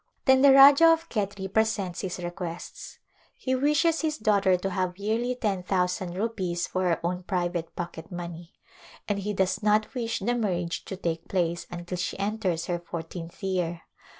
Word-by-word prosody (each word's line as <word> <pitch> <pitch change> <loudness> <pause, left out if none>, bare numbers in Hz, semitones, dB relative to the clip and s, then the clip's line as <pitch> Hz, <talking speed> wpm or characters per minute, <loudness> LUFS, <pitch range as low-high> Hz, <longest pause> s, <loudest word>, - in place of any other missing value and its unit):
Then 265 0 +5
the 280 0 +8
Rajah 275 +4 +9
of 330 0 0
Khetri 200 -3 -2
presents 220 -5 0
his 185 -3 -4
requests. 175 -1 -7 0.4
He 260 - -2
wishes 300 +5 +2
his 310 -1 -1
daughter 200 -4 +3
to 195 +2 -3
have 185 -1 -2
yearly 225 +5 -1
ten 205 -6 -1
thousand 180 -1 -1
rupees 185 -5 -2
for 185 0 -2
her 170 -2 +1
own 180 +1 -1
private 175 -2 -2
pocket 170 -1 -6
money, 175 0 -7 0.5
and 205 -1 0
he 205 +1 -2
does 190 +1 0
not 215 +2 +2
wish 230 -3 -2
the 235 +5 0
marriage 180 -7 -2
to 190 - -6
take 165 -3 -3
place 170 -2 -1
until 175 0 -5
she 170 -1 -3
enters 200 -4 -1
her 175 -1 -2
fourteenth 170 +1 -8
year. 175 -3 -1
190 Hz, 170 wpm, -27 LUFS, 175-220 Hz, 0.5 s, Rajah